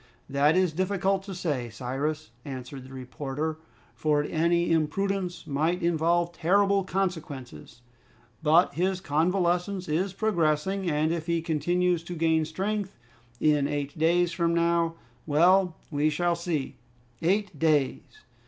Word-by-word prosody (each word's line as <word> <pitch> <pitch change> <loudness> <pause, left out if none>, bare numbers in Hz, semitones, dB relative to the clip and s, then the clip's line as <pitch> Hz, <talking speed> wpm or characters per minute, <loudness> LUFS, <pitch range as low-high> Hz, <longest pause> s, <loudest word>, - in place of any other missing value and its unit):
"That 145 +4 +3
is 185 -3 +2
difficult 190 +2 0
to 195 -2 -6
say, 145 -9 -2
Cyrus," 140 +6 -3
answered 130 0 -7
the 130 - -13
reporter, 140 +4 -4 0.3
"for 150 -1 +1
any 170 +2 +1
imprudence 180 +3 -1
might 160 +5 0
involve 170 +1 +1
terrible 195 +4 +2
consequences. 150 - -4 0.6
But 160 +3 +4
his 185 +4 0
convalescence 180 +3 0
is 175 +5 0
progressing, 190 -2 0
and 155 +1 +1
if 165 -1 -3
he 170 0 +1
continues 175 +2 +1
to 175 - -6
gain 160 -1 +2
strength, 195 +2 -3 0.4
in 150 -2 +3
eight 145 -1 -3
days 170 +2 +2
from 170 0 0
now 170 0 +2 0.3
well, 175 +4 +4 0.2
we 150 +1 +2
shall 175 +3 +1
see." 170 -5 -3 0.4
Eight 190 -2 0
days! 150 -4 0
165 Hz, 125 wpm, -27 LUFS, 150-180 Hz, 0.6 s, But